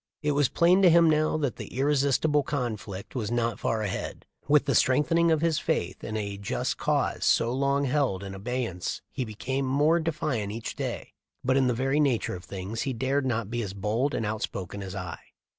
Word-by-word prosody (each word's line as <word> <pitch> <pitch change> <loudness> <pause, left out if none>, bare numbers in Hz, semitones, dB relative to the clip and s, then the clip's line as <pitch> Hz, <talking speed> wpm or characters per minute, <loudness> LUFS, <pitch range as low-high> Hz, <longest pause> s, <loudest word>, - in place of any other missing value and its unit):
It 150 - +2
was 145 -2 +2
plain 180 +3 +4
to 185 - +7
him 170 0 +6
now 155 0 +2
that 145 -5 -2
the - - -7
''irrepressible 140 +2 +2
conflict" 110 -8 -4
was 110 -5 -2
not 115 -2 0
far 110 -1 0
ahead. 100 - -4 0.2
With 145 0 +4
the 140 - +1
strengthening 150 +8 +3
of 160 -2 +2
his 165 -2 +2
faith - - -2
in 110 - -3
a 100 -2 -4
just 100 - -2
cause - - 0
so 115 +1 +3
long 140 +1 +1
held 130 -8 0
in 95 -1 -6
abeyance 100 -3 -3
he 130 - -2
became 130 +5 -3
more 150 +5 +3
defiant 150 -10 -2
each 115 +2 -5
day. - - -4 0.3
But 130 +1 +2
in 135 -1 +3
the 125 - +1
very 135 +4 +1
nature 135 -6 +1
of 90 0 -8
things 100 +4 -5
he 135 - -1
dared 130 +3 0
not 115 -3 -1
be 120 0 -1
as 100 -4 -4
bold 110 +8 0
and 110 - -1
outspoken 100 -2 -4
as 95 0 -6
I. 90 -3 -5
130 Hz, 200 wpm, -27 LUFS, 105-145 Hz, 0.3 s, to